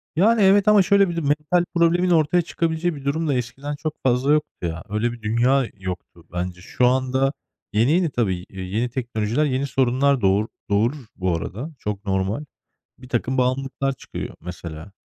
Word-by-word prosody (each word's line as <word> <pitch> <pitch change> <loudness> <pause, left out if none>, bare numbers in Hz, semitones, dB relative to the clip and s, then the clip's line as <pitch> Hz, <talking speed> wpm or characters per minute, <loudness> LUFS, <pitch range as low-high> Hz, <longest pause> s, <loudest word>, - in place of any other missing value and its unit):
Yani, 215 +7 +4
evet, 200 +1 +5
ama 210 -1 +7
şöyle 200 0 +4
bir 170 - -3
de: 170 - -1
Mental 150 +4 +1
problemin 170 +2 +3
ortaya 170 +1 +4
çıkabileceği 165 0 -1
bir 140 -1 -10
durum 160 +3 0
da 145 - +2
eskiden 135 +4 -3
çok 155 +1 -5
fazla 130 +3 +3
yoktu 150 0 +1 0.2
ya. 80 0 -5
Öyle 105 +3 0
bir 120 -1 -10
dünya 125 +5 +2
yoktu 90 -2 -7
bence. 90 +1 -4
Şu 125 +7 0
anda 130 +2 +1 0.4
yeni 115 +6 +3
yeni, 175 0 +3
tabii, 115 -8 0
iii, 95 -1 -7
yeni 120 +3 +1
teknolojiler 120 +1 -1
yeni 135 -1 0
sorunlar 130 +1 +2
doğur 100 +2 +3 0.2
doğurur 115 +7 +1
bu 95 -3 0
arada. 115 - -5
Çok 105 0 -4
normal. 95 +8 -1 0.5
Birtakım 130 0 -2
bağımlılıklar 135 +2 0
çıkıyor - - -7
mesela. 85 +1 -8
130 Hz, 170 wpm, -23 LUFS, 105-155 Hz, 0.5 s, ama